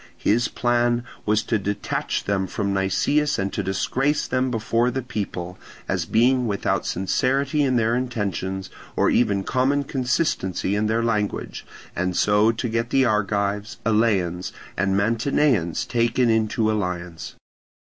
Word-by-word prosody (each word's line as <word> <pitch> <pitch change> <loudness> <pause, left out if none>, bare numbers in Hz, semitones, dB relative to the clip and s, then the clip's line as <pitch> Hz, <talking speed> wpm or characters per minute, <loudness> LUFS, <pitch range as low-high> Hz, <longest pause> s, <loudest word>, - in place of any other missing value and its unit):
His 120 +3 +2
plan 120 0 +1 0.2
was 105 +1 +2
to 115 - 0
detach 100 +1 -2
them 95 -1 0
from 100 +1 -2
Nicias 120 +10 +1
and 95 0 -2
to - - -1
disgrace 135 +10 0
them 130 0 0
before 115 +1 +1
the 130 +1 -3
people, 95 -6 -5 0.3
as - - -1
being 125 +2 +3
without 100 -2 -1
sincerity 135 - 0
in 130 -3 +2
their 115 -1 +2
intentions, 100 -6 -3 0.2
or - - +3
even 100 -5 +2
common 135 +5 +1
consistency 125 - -1
in 105 +1 +1
their 115 +1 +1
language, 105 -3 -2 0.3
and 90 0 -1
so 105 +2 +4
to 115 +1 -3
get 115 +1 -1
the 135 +1 +3
Argives, 105 -1 0
Eleans, 100 -6 +1 0.2
and 95 +1 +1
Mantineans 115 - +1
taken 120 0 +2
into 110 0 +1
alliance. 90 -5 -4
110 Hz, 135 wpm, -23 LUFS, 100-125 Hz, 0.3 s, so